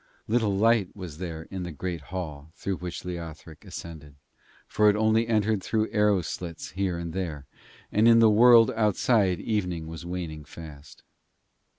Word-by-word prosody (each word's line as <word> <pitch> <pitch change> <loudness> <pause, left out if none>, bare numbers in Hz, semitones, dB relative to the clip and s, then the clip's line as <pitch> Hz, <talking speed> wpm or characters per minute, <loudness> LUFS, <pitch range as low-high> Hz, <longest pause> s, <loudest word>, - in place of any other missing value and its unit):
Little 110 -3 +1
light 110 -2 +2
was 90 -6 -8
there 85 -3 -5
in 95 -1 -4
the 90 -1 -5
great 85 +1 -5
hall 80 -5 -6
through 100 -2 -3
which 90 0 -7
Leothric 80 -3 -8
ascended, 75 -4 -9 0.5
for 105 0 +4
it 105 - +3
only 110 +1 +2
entered 110 -2 +1
through 110 +2 -1
arrow 105 -3 +2
slits 85 0 -6
here 95 -2 -2
and 85 -1 -5
there, 80 -6 -4 0.5
and 110 +2 +4
in 115 0 +7
the 115 -1 +7
world 115 +1 +7
outside 105 -3 +2
evening 90 -7 -2
was 80 +1 -8
waning 85 -3 -5
fast. 75 -1 -12
90 Hz, 160 wpm, -26 LUFS, 80-105 Hz, 0.5 s, in